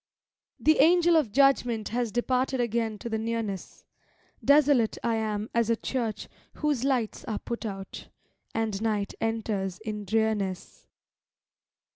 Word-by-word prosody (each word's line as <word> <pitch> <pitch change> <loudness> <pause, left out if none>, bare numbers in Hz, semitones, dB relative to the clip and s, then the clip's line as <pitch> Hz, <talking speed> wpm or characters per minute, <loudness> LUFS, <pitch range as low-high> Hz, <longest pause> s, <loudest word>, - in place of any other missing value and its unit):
The 310 - +3
Angel 345 0 +5
of 295 -10 +2
Judgment 245 -4 +3
has 235 -1 -1
departed 255 +2 0
again 230 -2 0
to 235 - -7
the 220 -1 -2
Nearness. 225 -4 -4 0.6
Desolate 285 -5 +4
I 235 - +1
am 215 -1 -2
as 235 -1 +1
a 230 - +4
church 230 -2 -3 0.3
whose 295 -5 0
lights 255 -5 0
are 215 -3 -2
put 235 -1 -5
out. 195 -2 -7 0.5
And 220 -3 -1
night 210 -3 -1
enters 210 -4 -2
in 210 -1 -5
drearness. 210 -3 -1
225 Hz, 130 wpm, -27 LUFS, 215-250 Hz, 0.6 s, Angel